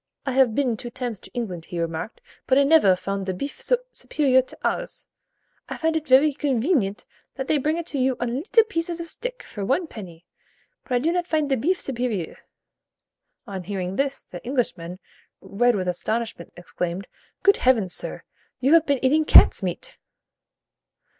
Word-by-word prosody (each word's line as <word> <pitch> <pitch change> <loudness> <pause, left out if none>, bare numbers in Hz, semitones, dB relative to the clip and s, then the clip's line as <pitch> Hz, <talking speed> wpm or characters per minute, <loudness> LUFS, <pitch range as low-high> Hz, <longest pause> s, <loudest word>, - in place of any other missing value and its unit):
'I 270 - -1
have 255 -4 +3
been 260 -5 +1
two 240 - -7
times 240 -4 -5
in - - -12
England,' 185 -9 -4
he 175 - -5
remarked, 165 +6 -4 0.3
but 260 - +4
I 280 - +6
nevère 275 - +5
find 195 +1 -3
the 190 -1 -3
bif 280 +10 -6
so - - +2 0.2
supérieur 260 -4 +2
to - - -11
ours. - - -2 0.6
I - - -5
find 320 0 0
it 315 -1 -2
vary 275 +3 +5
conveenient 260 - 0 0.3
that 265 -1 -4
they 300 - +2
bring 305 +4 0
it 340 -2 -6
you 260 -2 +1
on 245 -1 -2
leetle 445 +6 +4
pieces 340 -5 -3
of 335 0 -6
stick, - - -6
for 205 - -7
one 270 - +1
penny: 180 - -11 0.6
but 255 - -5
I - - +4
do 305 +7 +1
not 355 0 -1
find 305 -4 0
the - - +4
bif 335 +10 +1
supérieur.' 235 - -3 1.1
On 195 -5 -6
hearing 185 0 -4
this, 275 +2 -1
the 175 - -10
Englishman, 205 -9 -2 0.4
red 240 +4 +1
with 185 -2 -2
astonishment, 220 +1 -3
exclaimed, 175 +1 -4 0.4
'Good 400 - +5
heavens, 225 -8 +2
sir! - - -4 0.4
you 265 +4 +3
have 330 -1 +5
been 280 -2 +1
eating 305 +4 +4
cat's - - +7
meat.'" - - -5
255 Hz, 180 wpm, -24 LUFS, 195-300 Hz, 1.1 s, cat's